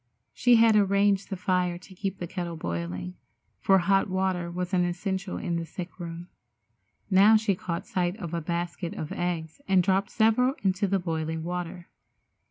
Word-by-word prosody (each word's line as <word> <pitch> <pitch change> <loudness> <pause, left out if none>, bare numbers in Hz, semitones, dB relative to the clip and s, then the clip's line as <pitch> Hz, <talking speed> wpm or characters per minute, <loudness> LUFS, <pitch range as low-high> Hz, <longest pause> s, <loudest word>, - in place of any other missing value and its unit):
She 245 -1 +4
had 225 -1 +6
arranged 200 -1 +3
the 195 - -2
fire 180 -1 0
to 185 +2 -14
keep 195 +1 -4
the 175 - -4
kettle 170 -1 -5
boiling, 90 - -4 0.5
for 195 - +4
hot 195 +2 +2
water 185 -2 -1
was 180 +2 -4
an 180 -1 +3
essential 190 +2 -2
in 170 -1 -2
the 170 - -2
sick 175 +3 -8
room. 170 0 -7 0.8
Now 200 +4 +7
she 215 -2 +1
caught 175 -2 -4
sight 180 +1 -1
of 175 -6 -6
a 170 - -1
basket 170 +1 -3
of 155 - -5
eggs 170 - -3
and 190 -2 +4
dropped 195 +1 +1
several 235 +4 +3
into 190 +1 +1
the 195 +1 +2
boiling 160 -2 -3
water. 175 0 -5
180 Hz, 175 wpm, -27 LUFS, 170-195 Hz, 0.8 s, Now